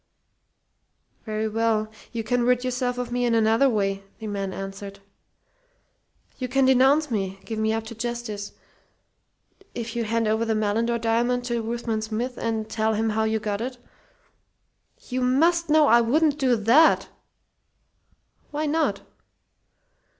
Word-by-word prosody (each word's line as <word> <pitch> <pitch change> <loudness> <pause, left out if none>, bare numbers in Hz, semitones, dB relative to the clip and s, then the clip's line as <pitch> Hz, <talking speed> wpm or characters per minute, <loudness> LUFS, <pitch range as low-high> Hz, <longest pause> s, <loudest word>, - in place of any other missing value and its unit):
"Very 215 0 -2
well, 220 0 0 0.2
you 230 -2 -3
can 245 +3 0
rid 250 +1 +2
yourself 250 0 -1
of 250 -1 -4
me 245 0 0
in 235 -1 +2
another 225 +4 +4
way," 195 -3 -1
the 220 - -9
man 200 -2 -3
answered. 195 +1 -7 1.4
"You 255 - -2
can 270 +2 +2
denounce 265 +3 +4
me 195 -3 -2
give 220 -1 -4
me 220 0 +1
up 225 0 -1
to 225 +1 -8
'justice.' 230 -3 -5 1.2
If 235 -1 -5
you 235 - 0
hand 225 +1 0
over 220 +1 +1
the 225 -1 0
Malindore 220 +3 0
diamond 235 +2 0
to 235 -1 -1
Ruthven 225 -1 -3
Smith 230 +4 -3
and 220 -1 -2
tell 220 0 0
him 225 +1 0
how 220 +1 0
you 220 0 +1
got 210 -1 -3
it 250 +1 -4 0.7
" - - -48
"You 255 0 -2
must 325 +7 +2
know 305 0 +5
I 235 -3 +6
wouldn't 295 +5 +2
do 255 -3 +3
that!" 235 +9 +4 1.4
"Why 300 +1 -2
not?" 315 +2 0
230 Hz, 150 wpm, -24 LUFS, 220-250 Hz, 1.4 s, I